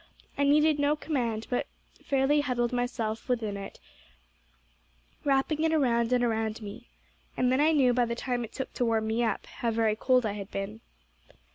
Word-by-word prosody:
I 285 - +1
needed 300 +1 +4
no 290 +1 +3
command, 240 -8 -2
but 245 - 0 0.4
fairly 275 +2 +2
huddled 245 -3 -1
myself 245 -1 -2
within 225 -5 -1
it, 195 0 -8 1.4
wrapping 285 +2 +1
it 320 - +2
around 240 -6 +2
and 250 -1 +3
around 220 -2 -1
me. 210 +2 -9 0.5
And 250 0 +2
then 260 +2 +3
I 310 +2 +5
knew 265 -5 +4
by 245 0 +2
the 235 0 -3
time 245 0 -2
it 225 - -8
took 265 - -6
to 245 - 0
warm 225 -1 +1
me 225 +2 0
up, 220 -3 -1
how 235 - -3
very 225 -1 +1
cold 255 +2 +2
I 215 - 0
had 200 -1 -7
been. 200 +3 -5
245 Hz, 180 wpm, -28 LUFS, 225-270 Hz, 1.4 s, I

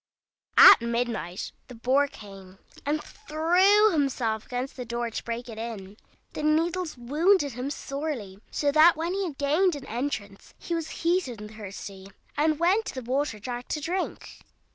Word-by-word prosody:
At - - +10
midnight 235 -7 -2 0.2
the 250 - -11
Boar 260 +5 +2
came, 195 -7 -13 0.3
and 300 +1 0
threw 370 +7 +3
himself 255 - -1
against 250 +2 -4
the 250 - -5
door 235 0 -3
to - - -5
break 235 +1 -5
it 225 -2 -8
in. 210 -4 -6 0.4
The - - -5
needles 325 +2 0
wounded 295 +6 +2
him 250 +3 -4
sorely, 275 -9 -5
so 290 -1 0
that 315 +3 +6
when 335 +3 -2
he 395 0 -1
had 305 -6 -6
gained 310 +5 +2
an 280 -2 -8
entrance 220 -5 -5
he 345 - -5
was 330 -2 -2 0.2
heated 335 - +1
and 210 +1 -9
thirsty, 195 -2 -9 0.3
and 305 +1 +2
went 380 +6 +3
to - - -5
the 255 -3 -6
water 275 -4 0
jar 240 +3 -5
to 300 - -4
drink. 355 +5 -4
275 Hz, 165 wpm, -27 LUFS, 230-320 Hz, 0.4 s, At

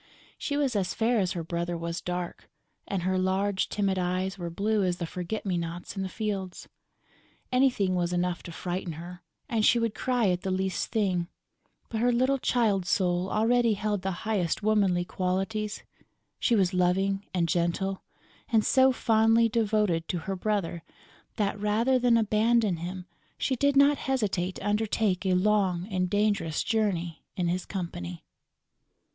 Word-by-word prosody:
She 285 - -2
was 275 -5 0
as 190 -2 -1
fair 230 +1 +2
as 185 -3 0
her 170 - -4
brother 170 +1 -3
was 170 +1 -4
dark; 180 -1 -5 0.4
and 190 -3 -2
her 185 +1 +1
large 190 +1 0
timid 195 -2 0
eyes 185 +1 -1
were 175 -3 -5
blue 205 +4 0
as 180 -1 0
the 175 - -3
forget 180 +6 -5
me 185 -3 0
nots 170 +3 -6
in 195 - -3
the 190 - -3
fields. 195 -4 -4 0.8
Anything 250 -7 +2
was 175 -1 0
enough 180 0 -1
to 170 - -9
frighten 175 +1 -4
her 175 +3 -9 0.3
and 225 -2 0
she 235 +3 +5
would 230 -2 0
cry 245 -5 +1
at 180 -1 0
the 195 - -3
least 190 -1 -1
thing; 185 -6 0 0.6
but 225 -1 -3
her 245 +1 +4
little 260 +3 +2
child 210 -8 +1
soul 180 -1 +1
already 230 +1 +3
held 205 -1 -1
the 190 +1 -4
highest 205 -4 0
womanly 200 -5 +2
qualities: 195 +4 -2 0.6
she 235 - +2
was 190 -3 +2
loving 195 +2 +1
and 175 -2 +1
gentle 175 +3 0 0.5
and 220 -2 +3
so 265 0 +5
fondly 225 -1 +3
devoted 210 -7 +1
to 180 - -2
her 195 +4 -4
brother 185 -4 -1 0.5
that, 205 -1 -1
rather 225 +5 +2
than 240 -1 +4
abandon 220 -2 +2
him, 180 +2 -6 0.3
she 265 - 0
did 280 +3 +2
not 280 0 +5
hesitate 200 -9 -1
to 200 - -5
undertake 205 -2 0
a 185 - +3
long 190 -2 +2
and 185 -1 0
dangerous 205 -6 +1
journey 180 -7 -1
in 180 -2 0
his 180 +1 -2
company. 90 - -5
195 Hz, 165 wpm, -28 LUFS, 180-220 Hz, 0.8 s, she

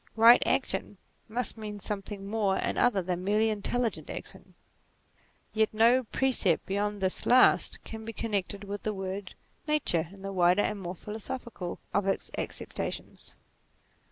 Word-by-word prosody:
Eight 235 +2 +9
action, - - 0 0.3
must 235 0 -2
mean 210 -1 -6
something 195 0 -5
more 200 -2 +1
and - - -1
other 215 -6 +3
than 180 0 -2
merely 210 +3 +3
intelligent 220 +3 -1
action: - - -8 1.0
yet 220 0 +2
no 235 +3 +5
precept 220 -9 +1
beyond 205 +1 -1
this 185 - 0
last, 255 +1 +5
can 220 0 -8
be 225 - -5
connected 205 -3 -2
with 205 0 -5
the 215 -1 -2
word 190 0 -5 0.3
Nature 220 - +1
in 195 0 -13
the 195 0 -4
wider 180 +2 +4
and 210 -2 -2
more 180 0 -5
philosophical 215 -1 -6 0.2
of 200 -1 +1
its 195 - -1
acceptations. - - -5
205 Hz, 145 wpm, -29 LUFS, 195-225 Hz, 1.0 s, Eight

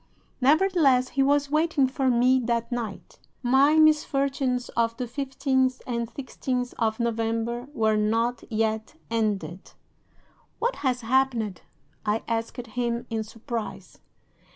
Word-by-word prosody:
Nevertheless, 285 -3 +4
he 275 - 0
was 285 +1 +2
waiting 310 -2 +3
for 265 0 0
me 250 +2 +4
that 235 +1 -1
night. 230 -4 -5 0.2
My 270 +5 +4
misfortunes 275 -5 +2
of 230 0 0
the 250 - -2
15th 260 0 0
and 235 -2 -3
16th 255 -2 -3
of 220 -1 0
November 230 +1 -1
were 220 -6 +1
not 230 +3 0
yet 220 +3 -1 0.2
ended. 200 -6 -2 0.8
"'"What 485 +2 -1
has 255 -2 0
happened?" 230 -5 +1 0.4
I 215 +1 0
asked 230 +1 -2
him, 235 +1 -2
in 220 -1 -1
surprise. 230 +1 -6
245 Hz, 120 wpm, -26 LUFS, 225-270 Hz, 0.8 s, Nevertheless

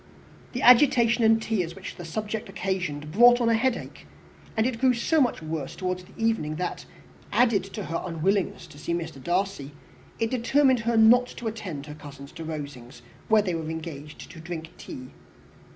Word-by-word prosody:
The 250 - -3
agitation 240 -2 +6
and 225 0 +5
tears 185 -7 -2
which 190 - -8
the 175 - -8
subject 215 +4 -4
occasioned 180 -6 -3
brought 240 +6 +7
on 235 -1 +2
a - - +4
headache; 245 +2 -2 0.5
and 220 - +3
it 245 -2 -1
grew 255 -1 +4
so 310 +6 +2
much 245 -9 0
worse 155 -3 -4
towards 185 -1 -3
the 190 - -19
evening 225 -10 0
that, 180 +2 -4 0.5
added 235 -6 +3
to 195 -1 -6
her 165 +2 -3
unwillingness 185 +3 -1
to 150 -3 -14
see 170 +3 -2
Mr. 160 -6 -6
Darcy, 175 -6 -1 0.4
it 225 0 -1
determined 260 +1 +3
her 230 0 0
not 240 +3 +6
to 240 - -9
attend 190 -10 -5
her 150 - -8
cousins 140 -2 -11
to 165 - -8
Rosings, 140 -6 -7 0.2
where 215 -1 +4
they 185 -3 -1
were 160 -1 -3
engaged 155 -2 -7
to 165 - -11
drink 165 -1 -7
tea. 130 0 -9
185 Hz, 180 wpm, -26 LUFS, 160-230 Hz, 0.5 s, brought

